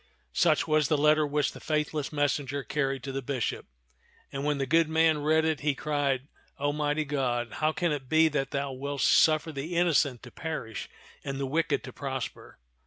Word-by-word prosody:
Such - - +3
was 155 -2 +3
the 150 - +2
letter 150 +1 +4
which 145 0 0
the - - -11
faithless 150 -1 -1
messenger 140 -2 -1
carried 135 -2 -1
to 135 - -4
the 135 +1 -3
bishop; 130 -3 -3 0.6
and 135 0 -4
when 150 0 +1
the 135 - -1
good 160 +3 +3
man 160 -1 +3
read 155 +2 +2
it, 160 -2 0
he 145 -1 0
cried, 140 -3 -1 0.3
"O 145 +1 0
mighty 150 +1 0
God, 125 -5 -1
how 155 0 +2
can 170 +1 0
it 135 -4 -4
be 160 0 +5
that 140 -2 -1
thou 140 -1 -2
wilt 140 +1 -4
suffer 155 0 +4
the 155 +4 -5
innocent 155 -7 +2
to 125 - -11
perish 155 -9 -5 0.3
and 135 0 -4
the 140 - -1
wicked 160 +5 0
to - - -9
prosper? 135 -3 -6
145 Hz, 190 wpm, -28 LUFS, 135-155 Hz, 0.6 s, be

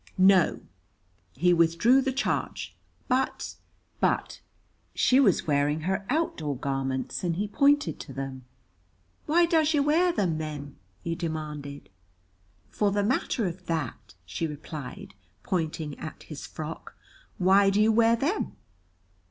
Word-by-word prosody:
No, 190 -2 +5 0.7
he 175 +6 +3
withdrew 170 +10 +4
the 265 - 0
charge, 265 +2 -2 0.3
but 260 +1 -1 0.5
but - - 0 0.5
She 260 - +4
was 210 -10 +3
wearing 145 +1 +1
her 190 +4 -2
outdoor 165 - -1
garments, 135 0 -2
and 170 -2 0
he 205 +4 -1
pointed 285 +7 +2
to - - -8
them, 135 -1 -6 0.8
"Why 340 +3 +5
does 320 -2 +2
yer 285 - +3
wear 330 +5 +3
them, 180 - 0
then?" 145 -2 -6 0.3
he 165 - -2
demanded. 150 -4 -5 0.8
"For 210 - +1
the 205 0 +1
matter 230 0 0
of 180 0 -5
that," 115 - -4
she 90 - -3
replied, 150 -6 -8 0.3
pointing 160 -4 -2
at 155 - -8
his 150 -3 -8
frock, 155 +1 -7 0.4
"why 195 +1 +5
do 195 +1 +1
you 215 +1 +5
wear 230 +1 +4
them?" 295 - -1
175 Hz, 130 wpm, -27 LUFS, 150-235 Hz, 0.8 s, No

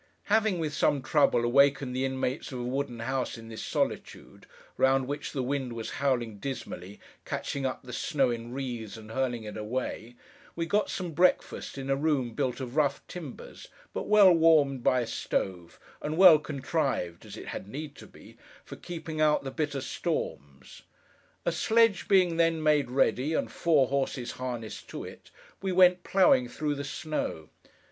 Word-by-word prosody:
Having, 215 -4 +3
with 155 -3 -2
some 140 -1 +1
trouble, 140 -4 +3
awakened 140 +1 +3
the 130 +1 0
inmates 130 +2 -2
of 130 - -5
a - - -3
wooden 125 -2 -3
house 130 0 -2
in 115 0 -11
this 110 - -7
solitude: - - -3 0.3
round 135 0 +3
which 145 +1 -4
the 130 - -2
wind 130 -1 -2
was 115 -1 -5
howling 120 -6 0
dismally, 100 -7 -6 0.2
catching 140 -1 -3
up 130 - -5
the 125 -1 -9
snow 135 0 +1
in 120 0 -5
wreaths 120 -5 -5
and 110 0 -11
hurling 125 -2 -1
it 105 - -7
away: 115 +1 -4 0.4
we 170 - -1
got 205 +6 +1
some 180 -3 -4
breakfast 175 -2 +1
in 135 0 -5
a - - +4
room 140 -5 0
built 130 -1 -1
of 130 -1 -6
rough 150 -3 +1
timbers, 160 -7 -9 0.3
but - - -4
well 210 -3 +7
warmed 155 -6 +4
by 125 +1 +3
a - - -2
stove, 90 -5 -3 0.2
and 155 +1 -3
well 180 -4 +9
contrived 140 - -2
(as - - -10
it - - -8
had 95 - -6
need 145 +6 -6
to - - -13
be) - - -17 0.3
for - - -9
keeping 160 -2 -5
out 150 -2 +3
the 135 - -5
bitter 145 -2 -2
storms. 70 - -4 0.6
A - - +2
sledge 225 -2 +3
being 180 -4 +4
then 165 -1 +2
made 150 -4 +3
ready, 135 +3 +1
and - - -1
four 155 -6 +3
horses 135 -2 -1
harnessed 120 -4 -6
to - - -6
it, - - -11 0.3
we 190 -1 -1
went, 180 0 +5
ploughing, 155 -10 +4
through 150 +3 -2
the 140 0 -4
snow. 145 - -4
135 Hz, 175 wpm, -28 LUFS, 120-155 Hz, 0.6 s, well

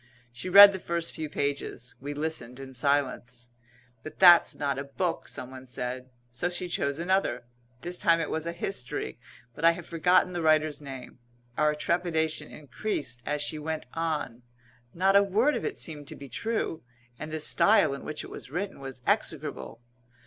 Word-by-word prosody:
She 125 +9 -6
read 200 +2 +10
the 190 - -4
first 170 -1 -2
few 155 -1 -5
pages. 140 -4 -3
We 145 +2 -5
listened 145 -5 -4
in 135 -1 -9
silence. 125 -2 -1 0.5
"But 155 - -10
that's 175 -2 +7
not 140 -2 -2
a - - -3
book," 165 +5 -3
someone 130 +1 -8
said. 125 +1 -5 0.2
So 125 +9 -1
she 180 +1 -4
chose 140 -5 -1
another. 190 -1 0 0.4
This 175 +3 -4
time 165 0 +4
it 165 - -2
was 160 +1 -2
a - - -1
history, 170 -7 -4 0.3
but 150 - -10
I 165 0 +7
have 170 0 -9
forgotten 180 +2 +2
the 175 - -2
writer's 155 -2 +2
name. 130 -3 -9 0.4
Our 150 +1 +2
trepidation 160 -2 0
increased 140 - -4
as 150 0 0
she 155 +1 -2
went 155 0 -4
on. 155 -7 -3 0.5
Not 190 +3 +3
a 200 - +8
word 215 +9 +2
of - - -3
it - - -3
seemed 150 -3 -5
to - - -6
be 140 - -10
true, 220 - -2 0.4
and 155 - -6
the 155 - -3
style 200 +1 +4
in 140 - -7
which 155 0 -5
it - - -10
was - - -9
written 190 +7 -4
was 135 -2 -8
execrable. 65 - -2
155 Hz, 180 wpm, -28 LUFS, 135-175 Hz, 0.5 s, read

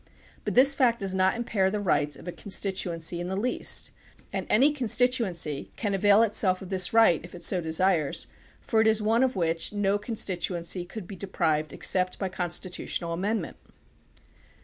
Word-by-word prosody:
But - - -3
this 270 +2 +7
fact 245 -4 +2
does 195 -1 -3
not 190 +2 +2
impair 215 -5 0
the 210 +2 -3
rights 150 -7 0
of - - -13
a - - -3
constituency 175 -4 -2
in 175 - -4
the 190 - -3
least, 235 +6 +1 0.4
and - - -3
any 270 +7 +5
constituency 235 - 0
can 205 -3 -2
avail 205 +3 +4
itself 200 -4 +2
of 185 - -10
this 185 -2 +1
right 225 -8 +4
if 175 0 -11
it 175 - -10
so 180 0 +1
desires, 160 -1 0 0.4
for 225 -3 +1
it 220 - +3
is 220 0 +3
one 220 +3 +1
of 260 -2 +1
which 165 -2 -1
no 205 0 0
con 225 +2 -6
stituency 175 -2 -2
could 215 -3 -7
be 200 - -8
deprived 160 -5 -1
except 185 -1 0
by 190 - -3
constitutional 175 -1 -2
amendment. 205 +6 -3
190 Hz, 175 wpm, -26 LUFS, 175-220 Hz, 0.4 s, this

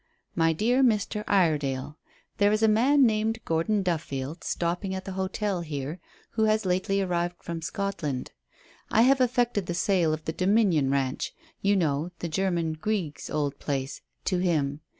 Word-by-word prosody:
"MY 165 0 +2
DEAR 240 - +2
MR. 210 -3 +1
IREDALE," 150 -7 +1 0.4
"There 205 0 +5
is 215 +1 +1
a - - +6
man 260 +6 +5
named 220 0 +1
Gordon 180 +6 +1
Duffield 155 -3 -3
stopping 175 +3 -2
at 190 - -6
the 195 - -5
hotel 190 0 -2
here, 150 +1 -5 0.3
who 220 -1 +1
has 215 -1 +2
lately 190 +2 +1
arrived 175 -1 -1
from 170 -1 -5
Scotland. 165 -7 -3 0.6
I 225 - +4
have 265 +1 +4
effected 245 -6 +1
the 175 - -2
sale 175 -3 +2
of 155 0 -4
the 160 - -2
Dominion 185 -7 +3
Ranch 135 -1 -1 0.3
you 200 +1 +3
know, 155 -3 0
the 170 - -4
German, 170 -1 0
Grieg's, 175 -2 -3
old 145 -2 -2
place 135 -1 -3 0.2
to 185 -3 +1
him. 150 -5 0
180 Hz, 160 wpm, -27 LUFS, 155-210 Hz, 0.6 s, a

